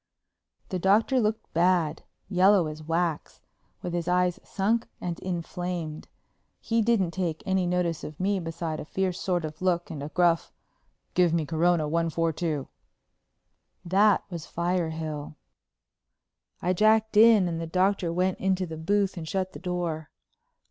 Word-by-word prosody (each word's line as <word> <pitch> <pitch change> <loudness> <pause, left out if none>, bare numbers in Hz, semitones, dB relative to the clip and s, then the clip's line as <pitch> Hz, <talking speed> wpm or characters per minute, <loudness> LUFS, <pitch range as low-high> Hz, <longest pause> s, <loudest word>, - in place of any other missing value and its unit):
The 185 - -2
Doctor 215 +8 +3
looked 220 -1 -1
bad, 170 -2 +2 0.3
yellow 190 -1 +4
as 155 0 -6
wax, 165 0 -2 0.4
with 175 - -4
his 175 -1 -2
eyes 180 0 +2
sunk 220 +4 0
and 175 -2 -4
inflamed. 175 -3 -4 0.5
He 230 0 0
didn't 215 -6 +2
take 170 -4 -3
any 190 -2 +1
notice 175 -2 0
of 150 - -8
me 195 +1 +1
beside 165 -2 -4
a - - -6
fierce 185 +2 -2
sort 175 -3 0
of 155 +1 -8
look 175 -2 0
and 150 -3 -6
a 145 - -5
gruff, 170 0 +2 0.6
"Give 175 -2 +3
me 160 -2 0
Corona 165 0 +2
1 165 +2 0
4 165 0 0
2." 155 -4 -2 1.2
That 200 +3 +4
was 170 -2 -6
Firehill. 160 -4 -2 1.3
I 180 - +2
jacked 220 +3 +3
in 215 -3 +7
and 165 -1 -3
the 165 - -4
Doctor 185 0 +1
went 185 +2 0
into 190 -1 +1
the 160 -2 -7
booth 195 +4 0
and 160 -2 -6
shut 185 +2 -2
the - - -8
door. 170 -4 -3
175 Hz, 150 wpm, -27 LUFS, 165-190 Hz, 1.3 s, in